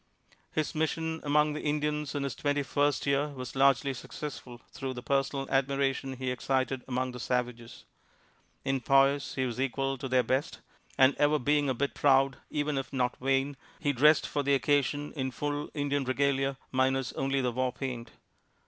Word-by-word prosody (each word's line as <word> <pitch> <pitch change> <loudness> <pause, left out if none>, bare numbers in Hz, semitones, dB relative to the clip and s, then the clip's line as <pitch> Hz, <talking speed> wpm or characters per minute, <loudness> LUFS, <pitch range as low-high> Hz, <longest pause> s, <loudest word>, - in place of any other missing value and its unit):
His 155 -1 -1
mission 160 +1 -1
among 150 +1 +3
the 150 - -4
Indians 150 -1 -1
in 145 - -1
his 140 -3 -2
twenty 145 +2 0
first 145 0 +1
year 140 +1 +2
was 130 -3 -7
largely 135 0 +3
successful 125 -1 -8
through 130 -1 -5
the 125 - -7
personal 135 0 0
admiration 135 0 0
he 130 0 -3
excited 130 0 -1
among 130 0 -1
the 125 - -8
savages. 125 -1 -3 0.8
In 135 -1 0
poise, 135 +2 +3
he 130 - 0
was 125 +1 -3
equal 135 0 -1
to 135 - -4
their 130 0 +3
best, 130 +7 -1 0.4
and 130 +1 +6
ever 150 +1 +3
being 145 +1 +2
a 130 - 0
bit 140 +3 -1
proud, 135 -1 +3
even 145 -2 -1
if 135 - -6
not 125 -2 0
vain, 135 +2 0 0.2
he 145 -2 +1
dressed 150 +4 +5
for 145 - -1
the 140 0 +3
occasion 145 +1 +1
in 130 -3 -2
full 145 +3 -3
Indian 145 -1 0
regalia, 135 +1 +1
minus 130 0 +1
only 135 0 0
the 125 -2 0
war 130 +1 0
paint. 125 -3 -5
135 Hz, 175 wpm, -29 LUFS, 130-145 Hz, 0.8 s, and